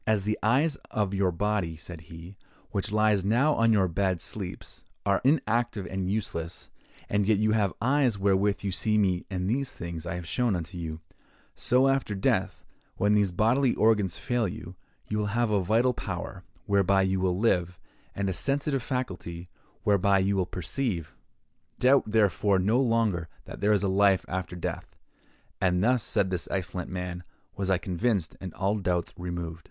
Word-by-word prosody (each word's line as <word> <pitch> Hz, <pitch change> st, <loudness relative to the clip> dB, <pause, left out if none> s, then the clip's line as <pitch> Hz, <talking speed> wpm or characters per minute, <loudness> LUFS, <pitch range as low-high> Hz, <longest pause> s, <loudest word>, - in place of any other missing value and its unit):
'As 110 Hz, -2 st, +2 dB
the 105 Hz, +1 st, -1 dB
eyes 140 Hz, +7 st, +2 dB
of 105 Hz, -2 st, -1 dB
your 95 Hz, -2 st, +2 dB
body,' 95 Hz, -3 st, -1 dB
said 85 Hz, 0 st, -9 dB
he, 85 Hz, +3 st, -11 dB, 0.4 s
'which 100 Hz, 0 st, -2 dB
lies 105 Hz, -2 st, +3 dB
now 125 Hz, +10 st, +3 dB
on 115 Hz, -3 st, +3 dB
your 100 Hz, -4 st, +4 dB
bed 95 Hz, +2 st, +1 dB
and 85 Hz, -, -8 dB
sleeps, 95 Hz, -2 st, -7 dB, 0.2 s
are 100 Hz, -1 st, +2 dB
inactive 120 Hz, -6 st, +1 dB
and 95 Hz, 0 st, -3 dB
useless, 85 Hz, -5 st, -4 dB, 0.4 s
and 100 Hz, -1 st, +1 dB
yet 110 Hz, -2 st, +4 dB
you 110 Hz, +1 st, +2 dB
have 105 Hz, -3 st, +2 dB
eyes 130 Hz, -2 st, +2 dB
wherewith 100 Hz, +1 st, +1 dB
you 100 Hz, -, -1 dB
see 105 Hz, +3 st, +2 dB
me 95 Hz, -4 st, +1 dB
and 90 Hz, -2 st, -2 dB
these 130 Hz, +5 st, -1 dB
things 85 Hz, -1 st, -6 dB
I 85 Hz, -, -3 dB
have 90 Hz, -1 st, -6 dB
shown 115 Hz, +4 st, 0 dB
unto 85 Hz, +1 st, -5 dB
you; 80 Hz, -2 st, -5 dB, 0.5 s
so 130 Hz, +3 st, +3 dB
after 135 Hz, -6 st, 0 dB
death, 95 Hz, -, 0 dB, 0.3 s
when 105 Hz, +1 st, +3 dB
these 105 Hz, -2 st, +3 dB
bodily 115 Hz, +8 st, +2 dB
organs 105 Hz, -5 st, +2 dB
fail 120 Hz, -4 st, 0 dB
you, 90 Hz, 0 st, -8 dB, 0.3 s
you 105 Hz, -, -1 dB
will 105 Hz, -, 0 dB
have 120 Hz, -2 st, +2 dB
a 100 Hz, -2 st, +2 dB
vital 115 Hz, +7 st, +2 dB
power, 95 Hz, -2 st, -6 dB, 0.2 s
whereby 100 Hz, -1 st, +3 dB
you 95 Hz, 0 st, +1 dB
will 90 Hz, -1 st, +1 dB
live, 90 Hz, -5 st, +1 dB, 0.4 s
and 100 Hz, 0 st, -1 dB
a 95 Hz, -, 0 dB
sensitive 140 Hz, -, 0 dB
faculty, 95 Hz, -9 st, -4 dB, 0.3 s
whereby 100 Hz, -1 st, +3 dB
you 95 Hz, +1 st, +1 dB
will 95 Hz, -2 st, 0 dB
perceive. 90 Hz, -, -3 dB, 0.6 s
Doubt, 130 Hz, +2 st, +4 dB
therefore, 105 Hz, -2 st, +2 dB
no 105 Hz, +7 st, +2 dB
longer 115 Hz, -9 st, +1 dB, 0.2 s
that -, -, -9 dB
there 105 Hz, -, +3 dB
is 105 Hz, -2 st, +3 dB
a -, -, +2 dB
life 95 Hz, 0 st, +3 dB
after 95 Hz, -1 st, -4 dB
death.' 90 Hz, -, -5 dB, 0.6 s
And 90 Hz, -1 st, +2 dB
thus," 125 Hz, +1 st, +3 dB
said 95 Hz, -2 st, 0 dB
this 90 Hz, -2 st, -2 dB
excellent 90 Hz, -2 st, -3 dB
man, 90 Hz, -1 st, -5 dB, 0.3 s
"was 95 Hz, -1 st, -2 dB
I 95 Hz, -, +4 dB
convinced, 95 Hz, 0 st, -1 dB
and 95 Hz, -2 st, -5 dB
all 100 Hz, +2 st, 0 dB
doubts 90 Hz, -3 st, -1 dB
removed." 85 Hz, -2 st, -5 dB
100 Hz, 180 wpm, -27 LUFS, 90-110 Hz, 0.6 s, your